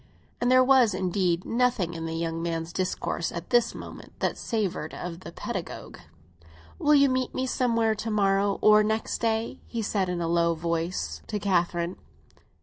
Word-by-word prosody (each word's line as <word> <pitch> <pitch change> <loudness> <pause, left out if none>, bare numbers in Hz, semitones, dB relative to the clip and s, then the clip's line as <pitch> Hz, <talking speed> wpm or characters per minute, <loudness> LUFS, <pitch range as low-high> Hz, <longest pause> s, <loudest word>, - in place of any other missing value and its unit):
And 245 - +2
there 255 0 +6
was, 255 -6 +5
indeed, 180 -2 0
nothing 235 -7 +1
in 165 -1 -5
the 165 - -4
young 165 0 -2
man's 165 0 -3
discourse 185 -2 -2
at 170 0 -7
this 240 -1 +3
moment - - -10
that - - 0
savoured 200 -9 -3
of 175 -1 -6
the 185 - -9
pedagogue. - - -6 0.8
"Will 300 0 +4
you 280 -1 +6
meet 255 -1 -1
me 260 - 0
somewhere 230 -3 +1
to 215 +1 -4
morrow 200 -1 +2
or 215 0 +7
next 220 +1 -1
day?" 225 0 -1
he 230 -2 -3
said, 195 -3 0
in 180 -1 -2
a 170 - -1
low 170 0 +2
tone, 165 +1 -1 0.4
to 210 - -2
Catherine. 175 -2 0
195 Hz, 170 wpm, -27 LUFS, 170-230 Hz, 0.8 s, or